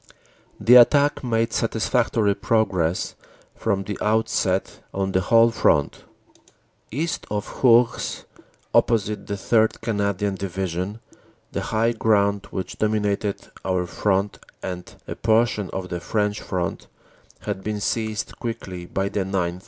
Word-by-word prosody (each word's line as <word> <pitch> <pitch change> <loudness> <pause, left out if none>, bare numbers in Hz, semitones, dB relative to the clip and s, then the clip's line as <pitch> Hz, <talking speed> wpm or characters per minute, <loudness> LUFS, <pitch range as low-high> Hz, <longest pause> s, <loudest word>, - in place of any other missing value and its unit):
The 125 +2 +7
attack 145 +4 +5
made 115 -2 0
satisfactory 115 -2 +1
progress 95 -6 0 0.4
from 100 -3 -1
the 100 +1 -5
outset 105 -3 0 0.2
on 95 0 -1
the 95 - +2
whole 115 +4 +5
front. 75 -10 +1 0.8
"East 160 +8 -3
of 105 +4 -5
Hourges, 120 -1 +3 0.5
opposite 105 -2 +2
the 100 - -2
3rd. 110 +2 +2
Canadian 100 -2 -1
Division, 95 +2 -3 0.5
the - - -2
high 115 +1 +1
ground 100 -3 +1
which 95 -1 -5
dominated 105 -1 -1
our 90 -1 0
front 100 +2 0 0.2
and 90 -1 -5 0.2
a - - -3
portion 110 -3 +1
of 95 -1 -5
the 85 - -3
French 105 +3 -1
front 90 -3 -3 0.5
had 95 - -4
been 105 -1 -2
seized 110 0 -2
quickly 95 -7 -5
by 95 +2 -1
the 100 0 -1
9th. 90 -2 -2
105 Hz, 125 wpm, -23 LUFS, 95-115 Hz, 0.8 s, The